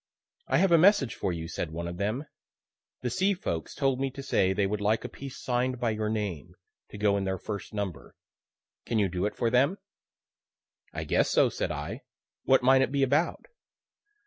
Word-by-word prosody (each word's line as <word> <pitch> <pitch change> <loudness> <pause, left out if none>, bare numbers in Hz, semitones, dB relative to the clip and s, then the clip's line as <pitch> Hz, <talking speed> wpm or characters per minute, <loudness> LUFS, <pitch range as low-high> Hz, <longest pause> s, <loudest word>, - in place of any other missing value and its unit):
"I - - +2
have 190 +1 +3
a 170 - +7
message 180 - +5
for - - -2
you," 80 -1 -4
said 80 - -4
one 85 +2 -5
of 85 0 -6
them; 110 - -2 0.8
"the 125 - -1
C. 195 - +2
folks 85 - -4
told 135 -2 +1
me 135 0 0
to 135 +1 -8
say 95 -7 +2
they 100 +1 +1
would 105 +1 -2
like 110 +2 +1
a - - -4
piece 135 -1 -9
sign'd 125 0 -1
by 120 -2 +1
your 110 0 -2
name, 95 -6 -3 0.3
to - - -9
go 100 -1 +2
in 100 - -1
their 95 0 -1
first 100 +2 -6
number. 100 -5 -5 0.7
Can 115 - -1
you 105 -2 +3
do 90 +3 -1
it - - -6
for 115 - 0
them?" 140 +10 +3 1.1
"I - - -4
guess - - +2
so," - - +4
said - - -3
I; 75 +1 -5 0.4
"what 130 -1 +4
might 130 +1 +6
it 130 - +1
be 140 -1 +2
about?" 145 +6 +1
110 Hz, 200 wpm, -28 LUFS, 95-135 Hz, 1.1 s, a